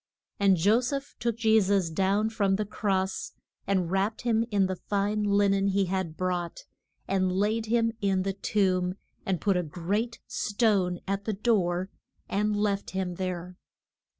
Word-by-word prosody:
And 195 -2 +4
Jo 205 +8 +4
seph 275 +2 -4
took 235 -1 -1
Je 220 -1 +4
sus 190 -3 +1
down 195 +5 +1
from 200 -4 +1
the 210 +2 -1
cross, 190 -2 -2 0.3
and 185 -3 +1
wrapped 195 +3 0
him 230 -2 +2
in 200 -3 +2
the 185 0 -2
fine 205 +3 -1
lin 200 -1 +3
en 195 0 +1
he 195 0 +2
had 185 -3 -3
brought, 180 -2 -2 0.4
and 185 -1 +1
laid 215 +4 0
him 230 0 +2
in 195 -2 +1
the 195 0 -1
tomb, 185 -2 0 0.3
and 190 -3 0
put 200 -2 +1
a 180 - +2
great 195 +8 -2
stone 200 -5 +1
at 195 +1 -2
the 220 - -1
door, 190 -4 +1 0.4
and 210 +1 0
left 205 -1 0
him 185 -2 -1
there. 180 -1 -4
195 Hz, 165 wpm, -28 LUFS, 185-210 Hz, 0.4 s, And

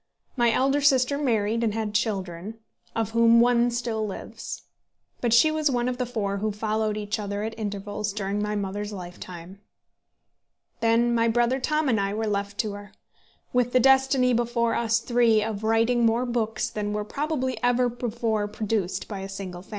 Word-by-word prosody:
My 240 -3 +3
elder 270 +4 +2
sister 270 -1 +3
married, 230 -4 +1
and 220 -2 0
had 220 -2 -2
children, 200 -2 -2 0.4
of 225 -1 -1
whom 230 0 +5
one 240 0 +4
still 235 -2 -2
lives; 205 -3 -6 0.6
but 240 - 0
she 240 +7 +6
was 310 -1 +1
one 245 -2 0
of 250 0 -3
the 250 - -1
four 205 -5 -2
who 215 +2 -1
followed 215 0 -1
each 210 +1 -3
other 205 0 -3
at 220 +1 -3
intervals 205 -1 -4
during 200 0 -2
my 210 0 -1
mother's 205 +1 -3
lifetime. 180 -1 -9 1.2
Then 230 +1 +3
my 230 0 +2
brother 240 +3 +2
Tom 305 +3 0
and 230 -5 +2
I 200 +1 -1
were 220 +1 -1
left 200 -1 -2
to 215 - -4
her, 205 0 -10 0.6
with 245 -1 +1
the 255 - +5
destiny 265 0 +4
before 235 0 +1
us 230 -1 +1
three 230 -2 +3
of 215 -1 -4
writing 225 +2 +2
more 230 +2 +2
books 235 -1 -1
than 210 -2 -3
were 210 0 -2
probably 260 -2 -2
ever 245 0 +3
before 230 -3 -2
produced 210 -3 -2
by 200 -3 -5
a 195 0 -6
single 190 -2 -7
family. 185 - -19
225 Hz, 180 wpm, -25 LUFS, 205-240 Hz, 1.2 s, she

